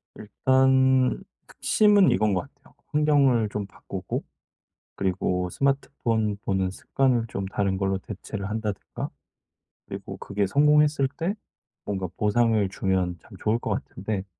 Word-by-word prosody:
일단 130 +3 +3 0.3
핵심은 205 -3 +4
이건 105 -1 +2
것 90 - +1
같아요. - - -24 0.2
환경을 140 -7 +3
좀 105 -1 -3
바꾸고 100 - -6 0.7
그리고 90 -1 -1
스마트폰 115 -5 0
보는 95 -1 0
습관을 125 +2 0
좀 100 -3 -4
다른 95 -1 -1
걸로 95 0 0
대체를 100 0 -6
한다든가. 105 -2 -4 0.8
그리고 - - -7
그게 100 0 -1
성공했을 150 +3 +4
때 175 +4 -1 0.5
뭔가 95 -2 -3
보상을 110 0 +2
주면 95 -3 -1
참 - - -21
좋을 110 +2 +1
것 - - -4
같은데 100 0 -3
110 Hz, 275 characters per minute, -25 LUFS, 95-130 Hz, 0.8 s, 핵심은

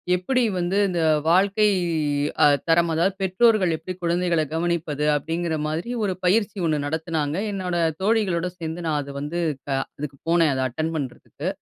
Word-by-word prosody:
எப்டி 245 +8 0
வந்து 180 +2 0
இந்த 175 -2 -1 0.3
வாழ்க்கை 195 +5 +4 0.8
அ - - +8 0.2
தரம் 170 +1 +3
அதாவது 175 +4 +2
பெற்றோர்கள் 190 -2 +3
எப்டி 165 +4 -6
குழந்தைகள 170 -1 +1
கவனிப்பது? 165 -3 -1
அப்டிங்கிற 165 +3 -2
மாதிரி 160 +8 -3
ஒரு 195 -2 0
பயிற்சி 205 +2 +2
ஒண்ணு 155 -2 +1
நடத்தினாங்க. 160 -1 -2 0.2
என்னோட 185 -3 -3 0.3
தோழிகளோட 190 -5 +1
சேர்ந்து 165 +1 -5
நான் 155 -2 0
அத 140 0 -8
வந்து 150 +4 -3 0.4
அதுக்கு 140 +1 -5
போனேன் 165 -3 +4
அத 130 0 -1
அட்டெண்ட் 155 +6 -3
பண்றதுக்கு. 135 -5 -5
170 Hz, 145 wpm, -23 LUFS, 155-185 Hz, 0.8 s, அ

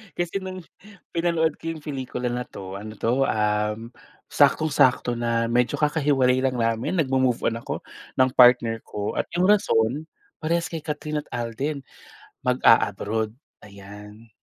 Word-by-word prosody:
Kasi 175 +2 -2
nung 185 -1 -7 0.5
pinanood 165 -2 0
ko - - -8
yung 155 - -11
pelikula 130 -4 -4
na 125 +1 -3
'to, 95 0 -8
ano 110 +1 -8
'to, 125 +6 +1
uhm 105 +1 -1 0.4
saktong-sakto 130 -5 +3
na 115 -1 0
medyo 125 +1 +2
kakahiwalay 140 -4 +2
lang 130 -1 0
namin, 115 +5 0
nag-mo-move 130 -6 +1
on 115 - -4
ako - - -6 0.3
ng 130 0 +3
partner 120 -3 +5
ko, 105 -1 -5
at - - -1
yung 175 - +2
rason 145 - +1 0.3
parehas 170 +2 -1
kay 165 - -3
Kathryn 150 0 -4
at 145 - -11
Alden, 130 +5 -3 0.6
mag-a-abroad. 110 -3 +2 0.3
Ayan. 105 +2 -13
125 Hz, 135 wpm, -24 LUFS, 115-150 Hz, 0.6 s, partner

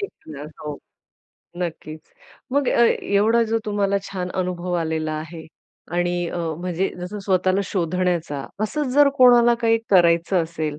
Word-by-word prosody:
तेच 400 - -4 0.2
ना. 145 -1 -8 0.2
हो. 150 -1 -5 0.8
नक्कीच. 160 -3 -5 0.5
मग 280 -1 +1
अ, - - +2 0.3
एवढा 220 +4 +4
जो 225 - +2
तुम्हाला 200 -1 0
छान 185 -2 -5
अनुभव 180 0 -4
आलेला 160 -1 -2
आहे 160 +1 -9 0.5
आणि 175 0 0
अ, - - -5 0.2
म्हणजे 180 +1 -1
जसं 180 +4 -6
स्वतःला 185 0 +2
शोधण्याचा. 170 -5 -2
असंच 260 +5 -2
जर 290 -1 +6
कोणाला 240 -1 +6
काही 225 0 +3
करायचं 170 -1 +4
असेल. 155 -2 -4
180 Hz, 140 wpm, -22 LUFS, 165-210 Hz, 0.8 s, जर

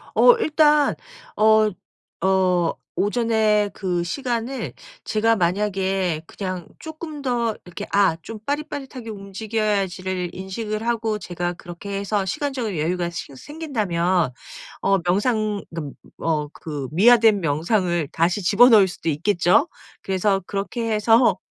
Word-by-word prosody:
어 - - +7
일단 300 -6 +3 0.4
어 215 0 +5 0.5
어 185 -3 +2 0.2
오전에 215 -1 +2
그 180 -3 -2
시간을 245 +5 -3 0.3
제가 225 +1 +2
만약에 190 -2 0
그냥 185 -3 -5
쪼끔 315 -1 -8
더 240 -4 0
이렇게 180 - -7
아 195 -5 +3
좀 220 +5 -8
빠릿빠릿하게 280 -5 -4
움직여야지를 195 -3 -2
인식을 210 +4 -4
하고 225 -2 0
제가 175 -2 -4
그렇게 175 +3 -7
해서 200 0 -1
시간적인 245 - -2
여유가 170 +3 -1
싱 165 -5 -7
생긴다면 185 - -1 0.5
어 195 - +3
명상 210 +3 0
어 - - 0
그 145 -3 -6 0.3
어 150 -2 0
그 145 -6 -6
미화된 220 +4 +5
명상을 170 0 0
다시 175 +4 0
집어넣을 210 +1 +6
수도 175 - -8
있겠죠. 175 - +2 0.3
그래서 195 +1 0
그렇게 215 +3 -3
해서 220 -1 +4
200 Hz, 265 characters per minute, -22 LUFS, 180-225 Hz, 0.5 s, 어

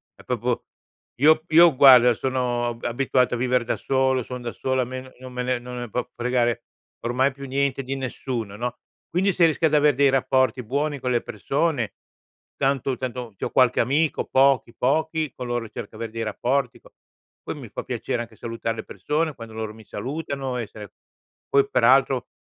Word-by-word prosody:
è - - -17
proprio - - -2 0.6
io 155 +1 +6
io, 165 -1 +7
guarda, 125 -2 +8
sono 125 -1 -1
a 115 - -6
abituato 125 0 +1
a - - -3
vivere 125 0 +1
da - - 0
solo, 130 -2 +1
son 125 +1 -7
da 120 - -4
solo, 130 -1 0
a - - -4
me 130 +1 -8
non 130 -1 -10
me 125 0 -2
ne 125 -1 0
non 125 +1 -8
ne 120 0 -4
può 125 +4 -2
fregare 120 -1 0 0.4
ormai 130 +3 +1
più 140 0 -9
niente 135 0 0
di 135 +2 -3
nessuno, 120 -5 -4
no, 125 +1 -3 0.3
quindi 190 +3 +2
se 170 - +4
rischi 160 +1 0
ad 155 -1 +3
avere 150 -2 +4
dei 140 0 +4
rapporti 130 -1 +2
buoni 140 +4 -1
con 125 0 -2
le 120 - +2
persone 135 +1 -1 0.6
tanto 135 -1 0
tanto 125 -4 -5
c'ho - - -3
qualche 130 -2 +4
amico, 145 +6 +1
pochi, 135 -3 +3
pochi, 155 +3 0
coloro 120 -3 -4
certo, - - -8
avere 115 -1 -4
dei 115 0 -3
rapporti 125 +4 -1
po - - -19 0.5
poi - - -4
mi - - -9
fa - - -5
piacere, 120 - -3
anche 115 -1 -14
salutare 115 -1 -4
le 110 - -5
persone, 150 - -2
quando 115 -1 -10
loro 110 -1 -4
mi 110 - -14
salutano, 135 +4 -4
essere 105 -3 -7 0.6
poi, 140 0 +3
peraltro, 130 +1 +3
130 Hz, 185 wpm, -24 LUFS, 120-140 Hz, 0.6 s, guarda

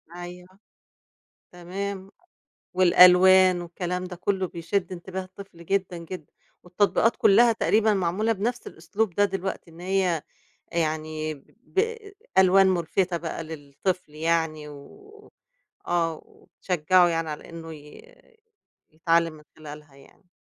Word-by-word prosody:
أيوه. 180 +2 -10 0.9
تمام. 190 +2 -6 0.6
والألوان 185 0 +6
والكلام 180 +1 -4
ده 180 0 -7
كلّه 190 +1 -1
بيشد 175 +3 -3
انتباه 185 +1 -6
الطفل 185 -2 -13
جدًا، 185 -1 -1
جدًا، 170 -1 -9 0.3
والتطبيقات 205 +5 +1
كلّها 230 +4 +5
تقريبًا 220 -1 +2
معمولة 195 +4 0
بنفْس 235 +4 -3
الأسلوب 185 +5 -3
ده 205 - +4
دلوقتي، 190 -3 -5
إن 165 - -15
هي 180 -3 0 0.5
يعني 155 -1 -2 0.3
ب 450 - -1 0.4
ألوان 190 +1 +6
ملفتة 180 0 0
بقى 165 -1 -5
للطفل 155 +2 -5
يعني 160 -1 -1
و 410 - -15 0.6
آه 165 -2 -1
وتشجّعه 180 0 +1
يعني 165 -1 -2
على 150 - -8
إنه 165 -1 -9
ي 150 - -15 0.8
يتعلّم 165 +1 +1
من 150 0 -16
خلالها 150 -2 -12
يعني. 140 +6 -21
180 Hz, 115 wpm, -25 LUFS, 165-195 Hz, 0.9 s, والألوان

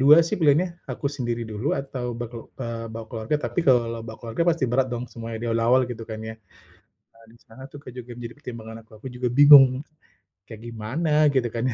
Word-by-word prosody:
dua 145 +4 +8
sih 190 - -1
pilihannya 170 +3 +2
aku 140 - -3
sendiri 120 -5 -3
dulu 110 +6 -3
atau 130 -3 -5
baku 120 -1 -8
eee, 115 -2 -4
bawa 115 0 -7
keluarga, 115 +6 -1
tapi - - -1
kalau 115 -3 +3
bawa 110 - -8
keluarga 115 +7 -2
pasti 165 -4 0
berat 130 +2 +2
dong 120 +1 -3
semuanya 115 -1 -6
di - - -2
awal-awal 115 +3 +3
gitu 115 -2 -6
kan 110 -1 -5
ya. 110 - -6 0.8
Nah 115 - -21
di 115 - -19
sana 115 +4 -14
tuh, - - -11
Kak, 125 - -10
juga 125 -1 -9
menjadi 120 -1 -7
pertimbangan 115 -4 -8
aku 110 - -32
aku - - -4
juga 125 0 -1
bingung, 140 -1 +8 0.6
kayak 110 -2 -10
gimana 120 +9 -3 0.2
gitu 130 -3 +2
kan 115 0 -3
ya? 130 - 0
120 Hz, 210 wpm, -24 LUFS, 115-135 Hz, 0.8 s, dua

